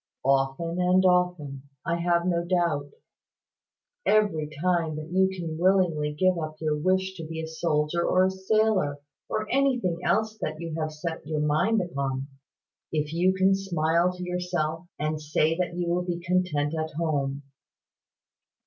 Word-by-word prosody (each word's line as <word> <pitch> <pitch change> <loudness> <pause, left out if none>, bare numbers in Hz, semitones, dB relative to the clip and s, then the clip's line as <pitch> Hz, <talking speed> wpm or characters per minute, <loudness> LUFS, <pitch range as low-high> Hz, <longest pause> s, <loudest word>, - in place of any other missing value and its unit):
"Often 135 +6 +1
and 185 +1 +4
often, 180 -7 +1 0.2
I 170 0 0
have 170 0 +1
no 170 -2 +1
doubt, 170 -5 0 1.1
every 200 -8 +2
time 170 -2 +1
that 155 +2 -7
you 190 +1 +3
can 170 -4 -5
willingly 175 -5 +2
give 185 +3 +2
up 155 -1 -4
your 155 -1 0
wish 185 +4 +1
to 165 - -6
be 160 0 -5
a 160 - -3
soldier 160 0 0
or 185 +1 +3
a 190 - +1
sailor, 190 -5 +1 0.3
or 215 0 -2
anything 250 -11 +1
else 220 +1 +1
that 155 0 -3
you 165 -1 -5
have 155 0 -2
set 160 0 -5
your 155 -1 -1
mind 175 +9 +2
upon, 135 -5 -3 0.7
if 150 0 -1
you 185 +3 +3
can 190 +1 +4
smile 170 -2 +1
to 180 0 -7
yourself, 180 -2 -2
and 155 +1 -2
say 155 +1 +1
that 180 -1 -1
you 175 -1 -2
will 175 +1 +1
be 175 -1 -2
content 170 -4 0
at 160 -1 -2
home. 145 -3 -1
170 Hz, 160 wpm, -26 LUFS, 155-185 Hz, 1.1 s, and